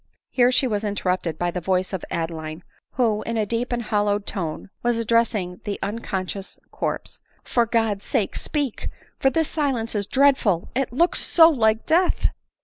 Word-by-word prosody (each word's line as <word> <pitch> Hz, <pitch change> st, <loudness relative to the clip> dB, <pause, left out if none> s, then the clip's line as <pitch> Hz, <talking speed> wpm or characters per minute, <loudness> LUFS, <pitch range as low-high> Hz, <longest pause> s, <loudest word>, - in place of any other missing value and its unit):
Here 245 Hz, -1 st, +4 dB
she 255 Hz, -, +3 dB
was 215 Hz, -4 st, -1 dB
interrupted 185 Hz, -5 st, -1 dB
by 175 Hz, 0 st, 0 dB
the 180 Hz, -, -4 dB
voice 185 Hz, +2 st, 0 dB
of 190 Hz, -, -3 dB
Adeline; 165 Hz, 0 st, -4 dB, 0.3 s
who, 225 Hz, -4 st, +1 dB
in 230 Hz, 0 st, -3 dB
a 215 Hz, -, +1 dB
deep 235 Hz, +4 st, -2 dB
and 240 Hz, -1 st, -1 dB
hollow 205 Hz, -1 st, +1 dB
tone, 190 Hz, -3 st, -5 dB
was 240 Hz, -1 st, +1 dB
addressing 225 Hz, -5 st, +1 dB
the 205 Hz, -, -3 dB
un 205 Hz, +4 st, -2 dB
conscious 190 Hz, -2 st, -4 dB
corpse. -, -, -4 dB
" -, -, -37 dB
For 235 Hz, -2 st, +4 dB
God's 220 Hz, -3 st, 0 dB
sake, 220 Hz, -8 st, 0 dB
speak! 285 Hz, -6 st, -2 dB, 0.3 s
for 270 Hz, -, +4 dB
this 320 Hz, +3 st, +1 dB
silence 265 Hz, -7 st, -1 dB
is 205 Hz, -2 st, -1 dB
dreadful 260 Hz, -10 st, +3 dB
— -, -, -34 dB
it 265 Hz, 0 st, 0 dB
looks 335 Hz, +8 st, +2 dB
so 330 Hz, -1 st, +6 dB
like 220 Hz, -5 st, +2 dB
death. 350 Hz, +3 st, +3 dB
220 Hz, 180 wpm, -23 LUFS, 190-245 Hz, 0.3 s, so